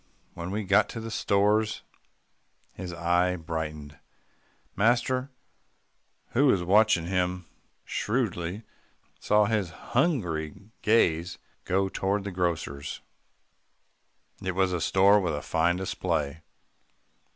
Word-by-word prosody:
When 85 +1 -6
we 105 +3 -2
got 100 +1 +3
to 115 - -6
the 115 0 -6
stores, 105 +1 +1 0.9
his 90 -1 -7
eye 90 +2 +1
brightened. 75 -4 -5 0.8
Master, 125 +5 +1 1.0
who 140 +4 +3
was 95 -9 +3
watching 100 -2 +4
him 90 0 -1 0.4
shrewdly, 105 -4 -2 0.6
saw 105 0 +3
his 105 -4 0
hungry 95 - -2
gaze 90 -6 +2 0.3
go 95 +1 +1
toward 95 +1 -1
the 100 - -5
grocer's. 85 -5 -3 1.4
It 95 -1 -3
was 95 -1 +2
a 85 - -1
store 100 +4 +5
with 85 -6 -1
a 75 - -4
fine 85 +2 +1
display. 80 -5 -2
95 Hz, 105 wpm, -27 LUFS, 85-105 Hz, 1.4 s, store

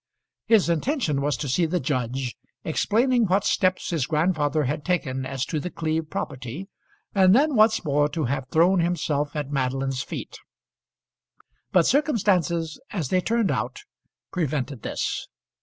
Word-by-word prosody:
His 220 -6 +5
intention 170 - 0
was 145 -2 0
to 145 - -4
see 165 +6 +2
the 180 +3 0
judge, 130 -2 -2 0.3
explaining 235 +9 +2
what 190 +2 +2
steps 185 -1 +1
his 155 -7 0
grandfather 155 -2 +1
had 145 +3 -2
taken 135 -8 -1
as 135 -1 -2
to 155 - -2
The 180 - -4
Cleeve 160 -2 -2
property, 135 - -5 0.4
and 190 0 +5
then 295 +4 +3
once 215 -3 +4
more 145 0 +2
to 160 0 -2
have 135 +1 -2
thrown 175 +5 +4
himself 150 -4 -1
at 145 -2 -3
Madeline's 135 -1 -1
feet. - - -7 1.3
But 180 -3 +4
circumstances 185 - +1
as 165 -10 -3
they 185 - +2
turned 230 0 +1
out - - -3 0.5
prevented 145 - -2
this. - - -3
160 Hz, 145 wpm, -25 LUFS, 140-185 Hz, 1.3 s, His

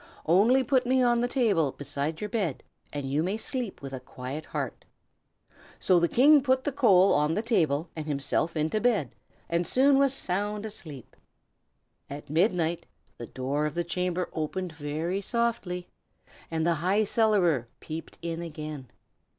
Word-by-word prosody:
Only 215 +11 +4
put 255 -1 +1
me 260 0 +3
on 240 -1 +3
the 245 - +1
table 205 - +1
beside 145 +2 -3
your 210 - -2
bed, 195 - -2 0.3
and 145 -2 -4
you 140 +3 0
may 190 +6 -1
sleep 235 - -4
with 135 -1 -7
a 130 - -4
quiet 130 +4 -7
heart." - - -4 0.9
So 185 -2 +4
the 170 - +3
King 285 +4 +6
put 260 -1 +1
the 290 - -1
coal 200 -8 +5
on 150 +2 +2
the 215 - -1
table, 160 - +1
and 155 -1 -5
himself 150 +3 0
into 155 +7 0
the - - -1
bed, 215 - +1 0.4
and 170 - +1
was 175 - -3
soon 275 +1 +4
sound 205 -3 -2
asleep. 155 - -9 0.9
At 145 0 -8
midnight 170 -1 +1 0.3
the 120 - -6
door 140 +4 -2
of 150 - -6
the 175 - 0
chamber 180 +1 -2
opened 175 +3 -3
very 160 +5 -3
softly, 225 -6 -2 0.6
and 160 -1 -1
the 170 - +3
High 195 +5 +2
Cellarer 195 - +2
peeped 160 +1 -7
in 170 0 -3
again. 155 -4 -7
175 Hz, 165 wpm, -27 LUFS, 155-220 Hz, 0.9 s, King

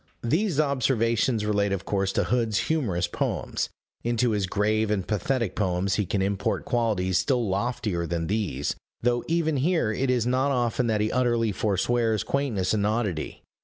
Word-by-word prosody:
These 160 - +1
observations 120 -5 +1
relate 100 -1 +1
of 100 0 -2
course 95 -1 0
to - - +2
Hood's 115 -3 +1
humorous 100 - 0
poems: - - -2 0.3
into 120 0 +1
his 100 -3 0
grave 110 +2 +1
and 100 -3 -1
pathetic 110 +1 -1
poems 95 -1 0
he 100 -1 0
can 95 +1 0
import 100 0 -1
qualities 105 -7 +1
still 125 -5 +1
loftier 100 -3 -1
than 85 -1 -2
these 90 -8 -1 0.3
though 120 0 +2
even 160 -2 +1
here 150 -5 +1
it 130 +5 -1
is 125 -3 +2
not 130 +3 +2
often 120 -2 +1
that 110 -2 +1
he 105 - 0
utterly 120 -3 +1
forswears 110 +3 +1
quaintness 115 -10 0
and 105 -1 +1
oddity. 105 -8 -2
110 Hz, 165 wpm, -26 LUFS, 100-125 Hz, 0.3 s, to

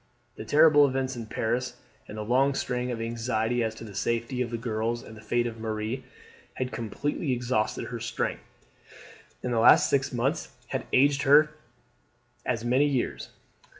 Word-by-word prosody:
The 110 - -8
terrible 150 +1 +6
events 130 0 -2
in 115 -2 -6
Paris, 120 +3 -2 0.3
and 105 - -8
the 105 - -3
long 135 +5 +2
strain 125 -1 -2
of 120 -2 -3
anxiety 115 +1 -1
as 110 0 -2
to 110 - -10
the 105 -3 -9
safety 115 +5 -1
of 120 - -1
the 115 - -3
girls 115 0 -2
and 110 - -11
the 110 - -12
fate 120 +2 0
of 115 -1 -5
Marie, 110 +3 -3 0.5
had 130 0 -3
completely 130 - -2
exhausted 120 -3 -1
her 120 - -5
strength, 115 - -3 1.0
and 125 - -1
the 115 - +2
last 150 +6 +6
six 140 -1 +1
months 135 +6 -1 0.2
had 130 - -3
aged 140 +1 +4
her 150 +2 +6 1.0
as 120 -2 -1
many 130 +4 +3
years. 135 -4 -2
120 Hz, 170 wpm, -27 LUFS, 115-130 Hz, 1.0 s, terrible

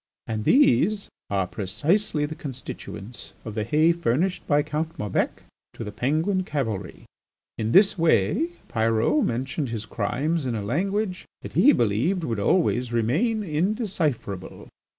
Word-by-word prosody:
And 110 -1 -3
these 205 - +4 0.2
are 95 -2 +1
precisely 150 - 0
the 150 - -5
constituents 125 -5 -8
of 110 - -5
the 110 0 -1
hay 155 +8 +3
furnished 170 +3 0
by 145 -1 +3
Count 160 +3 -3
Maubec 105 -3 -1 0.3
to - - -6
the 105 - -6
Penguin 155 - 0
cavalry. 110 - -4 0.5
In 110 0 0
this 195 - +5
way 160 - +3 0.2
Pyrot 115 - +2
mentioned 130 - -2
his 115 -2 -4
crimes 135 +9 -1
in 120 - -1
a 105 - -3
language 185 - -1 0.2
that - - -8
he 290 - +6
believed 120 - +1
would 115 -7 -2
always 125 - +2
remain 160 - +1
indecipherable. 160 - -2
145 Hz, 135 wpm, -25 LUFS, 110-180 Hz, 0.5 s, he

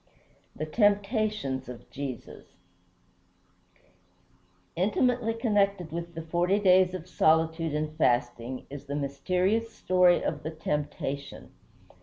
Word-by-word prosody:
IX - - -36 0.5
THE 155 - -3
TEMPTATIONS 205 - 0
OF 125 -2 -10
JESUS 135 -4 -7 2.3
Intimately 225 +5 +1
connected 200 -6 +1
with 170 0 -6
the 165 - -5
forty 175 +4 +1
days 185 -2 +4
of 180 -1 -7
solitude 160 -2 +2
and 155 0 -2
fasting 120 -1 0
is 145 -1 -8
the 140 0 -4
mysterious 180 +11 0
story 180 -1 +3
of - - -2
the 155 - -4
Temptation. 150 -3 -4
170 Hz, 110 wpm, -28 LUFS, 145-200 Hz, 2.3 s, days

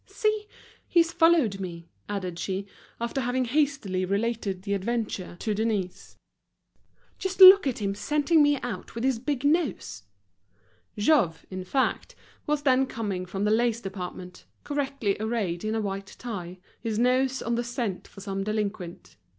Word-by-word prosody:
"See! 430 -2 -1 0.4
he's 335 -1 +3
followed 325 - +3
me," 170 -3 -6 0.2
added 185 -4 -4
she, 195 +2 -3 0.3
after 235 +4 -2
having 250 +1 0
hastily 265 -8 0
related 200 -1 -1
the 200 -1 -2
adventure 200 -3 -2
to 215 - 0
Denise. 210 -4 -2 1.0
"Just 380 0 -3
look 380 -3 +10
at 235 -5 -2
him 195 0 0
scenting 300 +8 +2
me 290 -1 +4
out 225 -5 -6
with 230 - -3
his 260 -3 +1
big 265 +1 -2
nose!" 295 - 0 1.0
Jouve, 205 - +2
in 185 0 -4
fact, 260 +8 -1 0.3
was 295 -1 0
then 265 -1 +3
coming 195 -7 -4
from 195 +2 -3
the 210 - +2
lace 235 0 +2
department, 185 -3 -7 0.2
correctly 275 -8 -1
arrayed 215 -6 -2
in 215 +1 -1
a 220 - 0
white 195 -1 -5
tie, 185 -7 -6 0.2
his 225 -2 -2
nose 255 +2 +2
on 235 - -1
the 235 +1 0
scent 235 -6 -3
for 195 - -13
some 195 -1 -3
delinquent. 205 -4 -4
225 Hz, 150 wpm, -27 LUFS, 195-265 Hz, 1.0 s, look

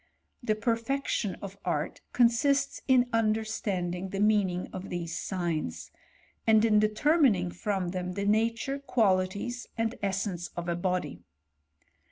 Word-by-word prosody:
The 215 -3 +1
perfection 230 -1 -1
of 200 0 -8
art 155 -3 -2
consists 270 +4 +2
in 255 -2 +5
understanding 215 -5 -1
the 195 - -4
meaning 205 -4 +2
of 190 +1 -6
these 170 -2 -4
lugns, 155 - -3 0.6
and 220 0 +6
in 210 -2 +5
determining 215 - +3
from 190 -1 -2
them 180 0 -3
the 200 +1 -2
nature, 230 +6 +1
quali 200 -9 +2
ties, 240 +6 -6
and 225 0 0
essence 195 -3 -2
of 175 0 -4
a 170 - 0
body. 175 - -2
205 Hz, 130 wpm, -29 LUFS, 180-230 Hz, 0.6 s, and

